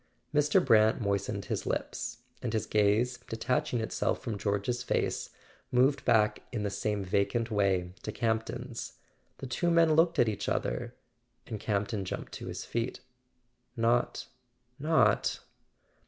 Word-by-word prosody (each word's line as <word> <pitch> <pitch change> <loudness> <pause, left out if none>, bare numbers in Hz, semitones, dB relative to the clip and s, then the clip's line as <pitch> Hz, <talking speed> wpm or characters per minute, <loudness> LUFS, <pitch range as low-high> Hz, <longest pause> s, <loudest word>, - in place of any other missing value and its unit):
Mr. 150 +5 +3
Brant 110 -3 +5
moistened 100 -1 -1
his - - -3
lips, 120 0 -3 0.2
and 120 -3 -3
his 110 -3 0
gaze, 110 +4 +2
detach¬ 120 +1 -1
ing 120 - 0
itself 110 - -1
from 115 -5 -4
George's 100 +4 -1
face, - - -1 0.4
moved 135 +3 +3
back 105 -2 +3
in 110 -4 -2
the 100 - -1
same 100 +1 -1
vacant 100 +5 0
way 95 -4 +1
to - - -4
Campton's. 115 +1 -2 0.4
The - - -7
two 130 +8 0
men 165 -2 +5
looked 165 +1 +4
at 120 - +4
each 105 -1 -2
other, 120 0 -2 0.5
and 110 -3 -5
Campton 100 0 -1
jumped 95 - -5
to - - -7
his - - -5
feet. 120 +2 -3 0.8
"Not—not 125 +2 0
115 Hz, 140 wpm, -30 LUFS, 105-125 Hz, 0.8 s, Brant